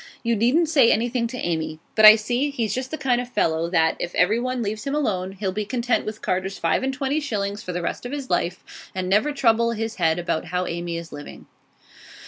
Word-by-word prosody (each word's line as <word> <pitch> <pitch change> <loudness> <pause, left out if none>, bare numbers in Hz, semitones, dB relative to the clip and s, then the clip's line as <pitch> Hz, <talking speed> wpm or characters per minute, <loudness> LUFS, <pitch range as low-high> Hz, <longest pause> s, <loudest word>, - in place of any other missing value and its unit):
You 235 -1 +1
needn't 250 +10 +3
say 275 -7 +5
anything 235 +1 0
to 250 +2 -7
Amy. 160 -5 -2 0.2
But 215 - +5
I 215 0 +12
see 240 +6 -1
he's 230 -7 -2
just 255 +2 -3
the 315 - -4
kind 250 -4 +1
of 245 - -8
fellow 165 -6 0
that, 160 -2 +2
if 175 - -4
everyone 240 +6 +1
leaves 215 +1 -4
him 275 - -1
alone, 190 -10 -1
he'll 195 -1 -3
be 210 +3 -2
content 240 +2 -1
with 215 0 -6
Carter's 190 +1 -2
five 165 - +1
and 265 0 -1
twenty 275 +2 -1
shillings 205 -8 -3
for 180 - -6
the 175 0 -3
rest 245 - -3
of - - -8
his 285 -2 -5
life, 180 +2 -3
and 185 -1 -2
never 210 +10 +2
trouble 235 -4 +2
his 225 0 -4
head 165 -3 +2
about 170 -2 -2
how 180 +2 -2
Amy 170 0 -4
is 170 0 -8
living. 145 0 -10
215 Hz, 225 wpm, -23 LUFS, 180-250 Hz, 0.2 s, I